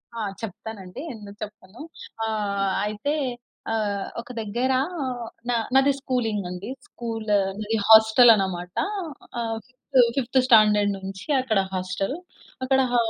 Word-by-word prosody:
ఆ! - - -5 0.2
చెప్తానండి. 205 0 -7
ఎందుకు 205 -2 -11
చెప్పను. 210 +1 -11 0.5
ఆహ్, 200 -3 -1
అయితే 215 +8 -2 0.6
ఆహ్, 205 -3 -1
ఒక 235 - -9
దగ్గర 240 +5 0 0.8
న - - +3 0.2
నాది 270 +1 +5
స్కూలింగండి. 210 -7 -2 0.2
స్కూల్ 225 -2 -5 0.3
నాది 220 +1 -1
హోస్టలన్నమాట. 220 -5 +6 0.6
ఆహ్, 225 -1 -2
ఫి 250 - -27 0.4
ఫిఫ్త్ 260 0 +2
స్టాండర్డ్ 210 -4 +5
నుంచి, 190 0 -7 0.2
అక్కడ 220 -6 +1
హోస్టల్. 185 +7 -2 0.5
అక్కడ 265 0 +3
హ - - +1
215 Hz, 110 wpm, -24 LUFS, 200-235 Hz, 0.8 s, హోస్టలన్నమాట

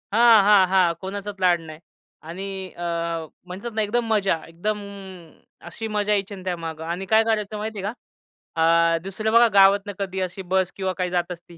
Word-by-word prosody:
हां, 230 -2 +6
हां, 200 -2 +6
हां, 185 -2 +3
कोणाचाच 200 +1 -6
लाड 180 -2 +3
नाही 155 -1 -11 0.5
आणि 185 +4 -6 0.3
अ, 175 - -6 0.6
म्हणतात 195 +6 -7
ना 220 - +1
एकदम 230 +3 0
मजा, 200 -4 +2
एकदम 200 +6 -3 0.9
अशी 225 +7 -6
मजा 210 0 0
यायची 200 0 -2
ना 185 - -11
त्यामागे 165 -3 -4
आणि 170 +4 -4
काय 220 +3 +4
करायचं 215 -2 -1
माहितीये 210 -2 -5
का 205 - -2 1.0
अ, - - +1
दुसरं 205 +3 -3
बघा 235 +1 +7
गावातून 200 +1 +5
कधी 190 -1 -3
अशी 185 +1 -4
बस 190 -1 +2
किंवा 190 -1 -2
काही 180 -1 -1
जात 175 0 -1
असती. 175 0 -11
195 Hz, 175 wpm, -23 LUFS, 180-210 Hz, 1.0 s, बघा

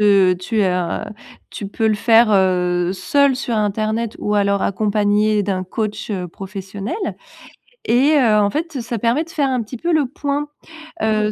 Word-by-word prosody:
heu, 195 -3 +5
tu 210 +3 -1
heu, 180 -2 0 0.5
tu 205 - -6
peux 220 +2 -1
le 215 - +3
faire, 225 +2 +4
heu, 180 -2 +2
seule 280 +7 +2
sur 250 -3 -3
Internet 215 +2 -1
ou 210 - -1
alors 200 -1 +2
accompagnée 210 +1 +1
d'un 190 -2 -2
coach, 215 +3 -4
heu, 185 -3 -3
professionnel. 195 - -6 0.9
Et 275 +6 +4
heu, 230 -5 +4
en 205 -1 +3
fait 310 - -3
ça 235 -2 -4
permet 240 +7 +1
de 330 - -16
faire 290 -4 0
un 255 -2 0
petit 225 +3 -7
peu 340 +7 -1
le 295 -4 +2
point, 290 +2 -3 0.5
heu, 215 -1 +1
215 Hz, 170 wpm, -19 LUFS, 200-240 Hz, 0.9 s, heu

